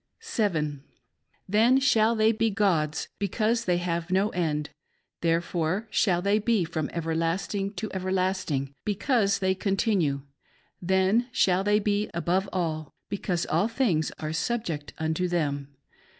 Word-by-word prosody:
7. 165 Hz, -, -1 dB, 0.6 s
Then 225 Hz, +7 st, +4 dB
shall 230 Hz, -4 st, +3 dB
they 220 Hz, 0 st, +4 dB
be 225 Hz, 0 st, +1 dB
gods, 175 Hz, -7 st, +1 dB
because 220 Hz, +4 st, 0 dB
they 180 Hz, -1 st, +2 dB
have 170 Hz, -1 st, -2 dB
no 190 Hz, +3 st, +2 dB
end; 150 Hz, -5 st, -2 dB, 0.5 s
therefore 170 Hz, +3 st, 0 dB
shall 180 Hz, -5 st, +2 dB
they 200 Hz, +2 st, +3 dB
be 215 Hz, -3 st, +2 dB
from 160 Hz, -2 st, -3 dB
everlasting 170 Hz, +4 st, -1 dB
to 220 Hz, -, -3 dB
everlasting, 185 Hz, -7 st, -1 dB
because 210 Hz, 0 st, +1 dB
they 190 Hz, -1 st, +1 dB
continue; 190 Hz, -7 st, 0 dB, 0.6 s
then 190 Hz, +6 st, +2 dB
shall 185 Hz, -4 st, +2 dB
they.be 205 Hz, 0 st, +1 dB
above 185 Hz, +3 st, 0 dB
all, 160 Hz, -5 st, -3 dB
because 185 Hz, -3 st, -1 dB
all 205 Hz, -, +1 dB
things 225 Hz, -, +1 dB
are 155 Hz, 0 st, -4 dB
subject 165 Hz, -7 st, -2 dB
unto 160 Hz, +3 st, -1 dB
them. 145 Hz, -5 st, -1 dB
190 Hz, 125 wpm, -27 LUFS, 165-210 Hz, 0.6 s, Then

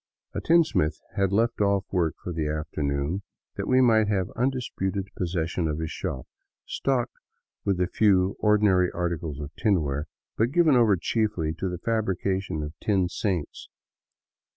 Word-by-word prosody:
A -, -, -3 dB
tinsmith 155 Hz, -, +3 dB, 0.2 s
had 100 Hz, -2 st, +1 dB
left 115 Hz, +2 st, +1 dB
off 100 Hz, -1 st, +2 dB
work 85 Hz, -4 st, +1 dB
for 90 Hz, -, -4 dB
the 80 Hz, -2 st, -1 dB
afternoon 75 Hz, +2 st, -2 dB, 0.3 s
that -, -, -4 dB
we 130 Hz, 0 st, +4 dB
might 110 Hz, -4 st, +4 dB
have 95 Hz, -3 st, 0 dB
undisputed 115 Hz, -7 st, -1 dB
possession 85 Hz, -1 st, -1 dB
of 75 Hz, -1 st, -2 dB
.his 80 Hz, 0 st, -3 dB
shop, 65 Hz, -, -4 dB, 0.4 s
stocked 130 Hz, -3 st, -1 dB, 0.5 s
with 100 Hz, -3 st, +1 dB
a 90 Hz, -, +3 dB
few 95 Hz, 0 st, +3 dB
ordinary 105 Hz, -4 st, +3 dB
articles 85 Hz, -4 st, -3 dB
of 75 Hz, 0 st, -6 dB
tinware, 75 Hz, -, 0 dB, 0.3 s
but 115 Hz, +2 st, +2 dB
given 160 Hz, -1 st, +4 dB
over 115 Hz, -5 st, +5 dB
chiefly 95 Hz, -5 st, 0 dB
to 95 Hz, +3 st, -3 dB
the 90 Hz, -, -4 dB
fabrication 95 Hz, -4 st, -1 dB
of 75 Hz, +1 st, -6 dB
tin 95 Hz, -4 st, +1 dB
saints. 90 Hz, -5 st, -3 dB
95 Hz, 150 wpm, -26 LUFS, 80-105 Hz, 0.5 s, over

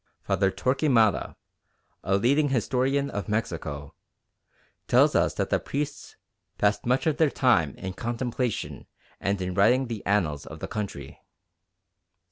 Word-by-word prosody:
Father 95 Hz, -1 st, +1 dB
Torquemada, 115 Hz, +2 st, +2 dB, 0.7 s
a 95 Hz, 0 st, +2 dB
leading 140 Hz, +8 st, +2 dB
historian 135 Hz, +3 st, 0 dB
of 100 Hz, +1 st, -4 dB
Mexico, 80 Hz, -9 st, -3 dB, 0.9 s
tells -, -, +5 dB
us -, -, +2 dB
that -, -, -2 dB
the -, -, +3 dB
priests 145 Hz, +1 st, -5 dB, 0.4 s
"passed 105 Hz, +2 st, +1 dB
much 125 Hz, +5 st, +2 dB
of 155 Hz, -2 st, +1 dB
their 160 Hz, -2 st, +4 dB
time 100 Hz, -, +2 dB
in 95 Hz, 0 st, -6 dB
contemplation 120 Hz, +2 st, -3 dB, 0.3 s
and 100 Hz, 0 st, -1 dB
in 90 Hz, 0 st, -3 dB
writing 115 Hz, +8 st, +4 dB
the 110 Hz, -4 st, -5 dB
annals 85 Hz, -8 st, 0 dB
of 80 Hz, -, -9 dB
the -, -, -5 dB
country." 70 Hz, -10 st, -6 dB
110 Hz, 130 wpm, -26 LUFS, 95-130 Hz, 0.9 s, tells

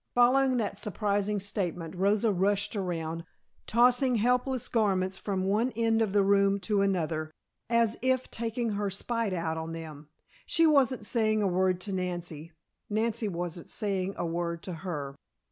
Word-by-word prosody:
Following 255 Hz, +2 st, +4 dB
that 205 Hz, -3 st, -2 dB
surprising 205 Hz, -1 st, 0 dB
statement 180 Hz, -4 st, -3 dB
Rosa 205 Hz, +4 st, +2 dB
rushed 200 Hz, +3 st, +1 dB
around, 165 Hz, -4 st, -3 dB, 0.4 s
tossing 245 Hz, +2 st, +4 dB
helpless 250 Hz, +2 st, +1 dB
garments 190 Hz, -4 st, +1 dB
from 195 Hz, -2 st, -2 dB
one 215 Hz, +6 st, +1 dB
end 225 Hz, 0 st, +2 dB
of 215 Hz, -3 st, +1 dB
the 200 Hz, 0 st, +3 dB
room 200 Hz, 0 st, +3 dB
to 205 Hz, +1 st, +1 dB
another, 165 Hz, -5 st, 0 dB, 0.4 s
as 235 Hz, -1 st, +2 dB
if 260 Hz, 0 st, 0 dB
taking 230 Hz, 0 st, -2 dB
her 205 Hz, 0 st, -1 dB
spite 230 Hz, +2 st, -2 dB
out 165 Hz, -3 st, -2 dB
on 160 Hz, 0 st, -5 dB
them. 155 Hz, -2 st, -9 dB, 0.4 s
She 330 Hz, -, +3 dB
wasn't 265 Hz, -7 st, +3 dB
saying 215 Hz, -2 st, +2 dB
a -, -, +2 dB
word 185 Hz, 0 st, +1 dB
to 200 Hz, -, -5 dB
Nancy; 175 Hz, -3 st, -4 dB, 0.4 s
Nancy 220 Hz, +1 st, 0 dB
wasn't 175 Hz, -2 st, -5 dB
saying 195 Hz, -3 st, -1 dB
a -, -, -2 dB
word 170 Hz, 0 st, -3 dB
to 185 Hz, -, -5 dB
her. 155 Hz, -5 st, -5 dB
200 Hz, 155 wpm, -29 LUFS, 175-230 Hz, 0.4 s, Following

